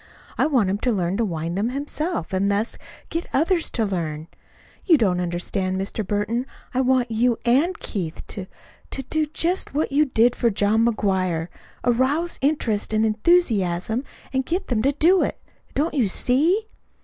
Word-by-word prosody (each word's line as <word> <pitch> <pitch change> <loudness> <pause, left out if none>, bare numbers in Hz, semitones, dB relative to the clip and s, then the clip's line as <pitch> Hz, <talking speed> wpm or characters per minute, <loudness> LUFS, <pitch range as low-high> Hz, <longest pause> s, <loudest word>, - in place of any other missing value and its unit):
I - - +2
want 250 -10 +2
him 200 - -1
to 250 - +1
learn 185 -2 0
to 230 - +1
wind 165 -2 -3
them 210 +5 0
himself, 290 - -3
and 195 +2 +1
thus 205 +3 -1 0.3
get 330 +1 -3
others 335 +4 +2
to 225 - 0
learn. 165 -5 -3 0.5
You 335 -5 +5
don't 190 -8 +1
understand, 185 +2 -2
Mr. 195 +3 -3
Burton. 215 +6 -1 0.3
I 260 - +2
want 255 -2 +2
you 235 +1 +2
and 285 +10 +3
Mr. - - -31
Keith 175 -7 -4
to 190 -2 -5 0.4
to 270 - -4
do 310 +4 -1
just 330 +1 -1
what 300 - 0
you 295 +2 +4
did 240 -2 +3
for 235 - +2
John 210 +2 +2
McGuire 185 -7 0 0.3
arouse 265 +8 +1
interest 245 -8 0
and 215 +1 +3
enthusiasm 220 - +2 0.3
and 265 0 +1
get 345 +8 -2
them 235 -4 +1
to 275 - +3
do 340 +6 +4
it. - - -1 0.4
Don't 310 +4 0
you 255 -8 +2
see?" 310 - +2
235 Hz, 175 wpm, -23 LUFS, 195-285 Hz, 0.5 s, You